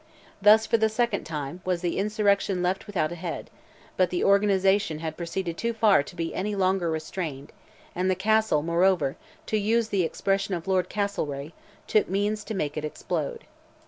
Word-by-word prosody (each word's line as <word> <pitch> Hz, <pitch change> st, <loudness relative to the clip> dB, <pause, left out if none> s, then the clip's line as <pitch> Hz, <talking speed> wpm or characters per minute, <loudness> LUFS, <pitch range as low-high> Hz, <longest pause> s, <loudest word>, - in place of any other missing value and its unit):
Thus, 215 Hz, +2 st, +7 dB
for 230 Hz, -, +2 dB
the 220 Hz, 0 st, +2 dB
second 225 Hz, -1 st, 0 dB
time, 150 Hz, +2 st, -5 dB
was 180 Hz, -2 st, -1 dB
the 175 Hz, 0 st, -1 dB
insurrection 200 Hz, -2 st, +1 dB
left 185 Hz, +4 st, -1 dB
without 170 Hz, -6 st, -1 dB
a 175 Hz, -1 st, -7 dB
head; 175 Hz, -3 st, -5 dB, 0.5 s
but 185 Hz, -2 st, +3 dB
the 180 Hz, -, -1 dB
organization 200 Hz, -3 st, +3 dB
had 160 Hz, 0 st, -5 dB
proceeded 170 Hz, 0 st, -4 dB
too 235 Hz, 0 st, -1 dB
far 220 Hz, -7 st, +4 dB
to 145 Hz, -, -10 dB
be 165 Hz, -1 st, -3 dB
any 205 Hz, +2 st, -2 dB
longer 190 Hz, -2 st, +1 dB
restrained, 155 Hz, -3 st, -4 dB, 0.4 s
and 185 Hz, +1 st, 0 dB
the 185 Hz, -, +2 dB
Castle, 215 Hz, -5 st, +2 dB
moreover, 170 Hz, -3 st, +2 dB, 0.3 s
to 215 Hz, -, 0 dB
use 220 Hz, +2 st, +1 dB
the 195 Hz, -3 st, +1 dB
expression 195 Hz, +3 st, 0 dB
of 170 Hz, +1 st, -7 dB
Lord 185 Hz, -2 st, +1 dB
Castlereagh, 160 Hz, -8 st, -3 dB, 0.3 s
"took 215 Hz, -, +2 dB
means 205 Hz, +2 st, 0 dB
to 220 Hz, -, -4 dB
make 150 Hz, -5 st, -2 dB
it 155 Hz, -, -3 dB
explode." 460 Hz, -, -3 dB
190 Hz, 175 wpm, -26 LUFS, 170-210 Hz, 0.5 s, Thus